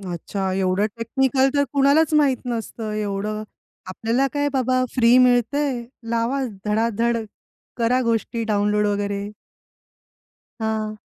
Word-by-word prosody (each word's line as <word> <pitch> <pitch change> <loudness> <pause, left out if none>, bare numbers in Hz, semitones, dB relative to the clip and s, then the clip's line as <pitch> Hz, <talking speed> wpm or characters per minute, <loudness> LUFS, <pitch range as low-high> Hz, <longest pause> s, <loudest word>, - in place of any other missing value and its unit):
अच्छा, 190 +1 -4
एवढं 190 +2 +1
टेक्निकल 265 +3 +1
तर 285 0 +3
कुणालाच 285 +3 +3
माहीत 285 -4 +4
नसतं, 225 -2 -4
एवढं 210 0 -3 0.5
आपल्याला 230 +8 0
काय 290 0 0
बाबा 255 -1 +1
फ्री 240 0 +5
मिळतंय, 250 +1 +2 0.3
लावा 235 +4 0 0.2
धडाधड 230 +2 +1 0.6
करा 240 +2 +2
गोष्टी 230 0 -1
डाउनलोड 210 -1 +1
वगैरे. 205 0 -2 1.3
हां. 215 -1 -2
230 Hz, 110 wpm, -22 LUFS, 210-255 Hz, 1.3 s, फ्री